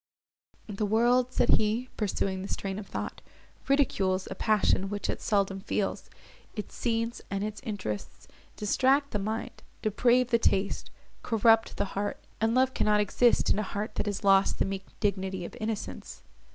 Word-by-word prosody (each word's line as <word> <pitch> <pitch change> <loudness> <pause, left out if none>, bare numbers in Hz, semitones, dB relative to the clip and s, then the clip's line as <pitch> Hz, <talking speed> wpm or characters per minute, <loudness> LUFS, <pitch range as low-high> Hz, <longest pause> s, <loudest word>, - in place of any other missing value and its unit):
"The 210 0 -2
world," 240 +4 +3
said - - +1
he, 220 +4 0
pursuing 195 -2 -1
this 195 - -3
train 195 0 -4
of 205 - -9
thought, - - -5 0.5
"ridicules 195 -9 +1
a - - -1
passion 200 -1 +2
which 205 0 -2
it - - -7
seldom 195 -2 +1
feels; 195 +1 -2 0.5
its 210 -3 -6
scenes, 230 0 -1
and 200 0 -2
its 210 0 -4
interests, 200 - -5 0.3
distract 270 +7 +2
the 210 - -1
mind, 215 +3 -4 0.2
deprave 240 +3 +3
the 235 - +4
taste, 195 -3 +1 0.3
corrupt 225 0 +3
the 200 - +1
heart, 205 +1 -2 0.2
and 225 +1 +2
love 260 +1 +3
cannot 210 0 +2
exist 230 +4 +3
in - - +1
a - - +2
heart 205 +1 -4
that 210 - -2
has 205 +1 -3
lost 195 0 +4
the - - +1
meek 195 0 -5
dignity 190 -3 -1
of - - -9
innocence. 215 -1 -5
210 Hz, 165 wpm, -29 LUFS, 195-230 Hz, 0.5 s, the